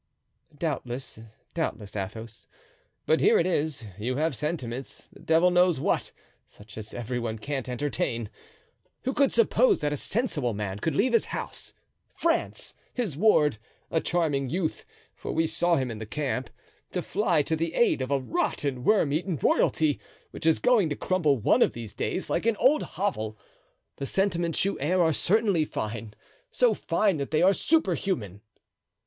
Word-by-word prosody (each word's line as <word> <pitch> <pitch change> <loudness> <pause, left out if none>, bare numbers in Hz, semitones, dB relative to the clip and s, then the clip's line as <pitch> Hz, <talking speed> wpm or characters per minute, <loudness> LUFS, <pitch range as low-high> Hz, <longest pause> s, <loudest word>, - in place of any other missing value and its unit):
"Doubtless, 135 -6 -4 0.3
doubtless, 110 -12 -3
Athos. 105 +3 -6 0.6
But 160 - +3
here - - +5
it 170 - +2
is: 150 -7 -1
you 125 +4 -1
have 155 0 0
sentiments, 135 -4 -4
the - - -16
devil 165 +3 +3
knows 180 -3 +4
what, - - 0 0.4
such 105 +1 -15
as 110 0 -7
every 120 +1 -3
one 115 -2 -3
can't 135 +2 -4
entertain. 120 -4 -2 0.7
Who 260 - -1
could 280 0 +3
suppose 235 +2 +4
that 150 0 0
a - - -2
sensible 150 - -1
man 100 -1 -4
could 155 +6 -1
leave 240 - +2
his 230 - +4
house, - - -6 0.4
France, 335 -1 -1 0.2
his 225 - -2
ward—a 150 - +1
charming 150 -6 0
youth, 165 0 -2 0.3
for - - -6
we 160 +1 +2
saw 165 +2 +2
him 130 -4 -1
in 110 - -6
the 110 - -6
camp—to 135 -1 -5
fly 150 - +1
to 160 - 0
the 165 +1 -2
aid 235 - +3
of 130 - -2
a 140 - +2
rotten, 130 +1 -1
worm 195 -8 +3
eaten 170 +1 -1
royalty, 155 -3 +2 0.3
which - - -4
is 160 - +5
going 225 -9 +3
to 145 - -2
crumble 155 -6 +1
one 110 - +3
of - - +4
these 115 -3 -7
days 185 - -2
like - - -1
an 230 -2 +2
old 295 +4 +4
hovel. 110 - -3 0.6
The 140 - -3
sentiments 175 -3 +1
you 200 - -1
air 175 +7 +1
are 160 -1 +3
certainly 200 -1 +2
fine, 110 -5 -5 0.4
so 245 -3 +3
fine 195 -1 +1
that 140 -1 -3
they 155 +2 +2
are 190 +2 +6
superhuman." 185 - 0
150 Hz, 165 wpm, -27 LUFS, 120-180 Hz, 0.7 s, are